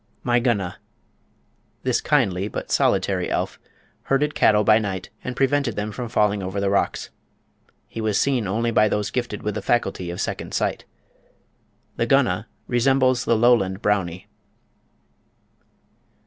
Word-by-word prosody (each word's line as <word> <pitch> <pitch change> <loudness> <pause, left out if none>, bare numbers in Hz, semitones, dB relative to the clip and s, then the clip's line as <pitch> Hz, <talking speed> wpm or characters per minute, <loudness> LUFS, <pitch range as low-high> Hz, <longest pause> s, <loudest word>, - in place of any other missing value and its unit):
My 120 0 +2
Gunna. 105 -8 -1 1.0
This - - +1
kindly, 95 +1 +1
but - - -6
solitary, - - +1
elf - - -2 0.5
herded 150 +2 +1
cattle 105 -1 +4
by 110 +1 +5
night, 95 -4 -4
and 125 - -4
prevented 135 -4 +1
them 105 +1 -3
from 120 +1 -5
falling 105 -3 +1
over 95 +2 -3
the 100 0 0
rocks. 100 - -1 0.8
He 115 - -6
was 110 -2 +1
seen 130 -7 +1
only 115 +5 0
by 110 -1 +4
those 105 -1 -1
gifted 120 -4 -3
with 105 - -2
the - - -4
faculty 95 -6 -1
of 85 - -5
"second - - -4
sight." - - -1 1.1
The - - 0
Gunna - - +2 0.2
resembles 130 0 +2
the 115 - +3
Lowland 110 -5 +3
"Brownie." 95 -3 -1
105 Hz, 140 wpm, -23 LUFS, 100-120 Hz, 1.1 s, by